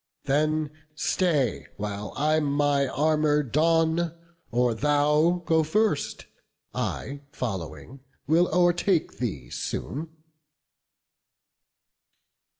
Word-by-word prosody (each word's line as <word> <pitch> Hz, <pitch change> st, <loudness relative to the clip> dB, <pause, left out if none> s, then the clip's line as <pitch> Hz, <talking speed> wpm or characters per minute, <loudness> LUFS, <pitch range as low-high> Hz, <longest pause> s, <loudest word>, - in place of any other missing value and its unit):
Then 155 Hz, +1 st, +1 dB, 0.2 s
stay, 150 Hz, -, 0 dB
while 105 Hz, 0 st, -4 dB
I 155 Hz, +1 st, +2 dB
my 145 Hz, -1 st, +1 dB
armour 150 Hz, +1 st, +2 dB
don; 165 Hz, +4 st, +2 dB, 0.3 s
or 120 Hz, 0 st, +2 dB
thou 150 Hz, +6 st, +2 dB
Go 160 Hz, -1 st, +3 dB
first: 175 Hz, +1 st, 0 dB, 0.5 s
I, 140 Hz, +1 st, -3 dB
following, 95 Hz, -, -5 dB, 0.3 s
will 170 Hz, +3 st, +4 dB
o'ertake 175 Hz, 0 st, +2 dB
thee 70 Hz, -, -4 dB
soon." 155 Hz, +4 st, -4 dB
150 Hz, 80 wpm, -26 LUFS, 130-160 Hz, 0.5 s, will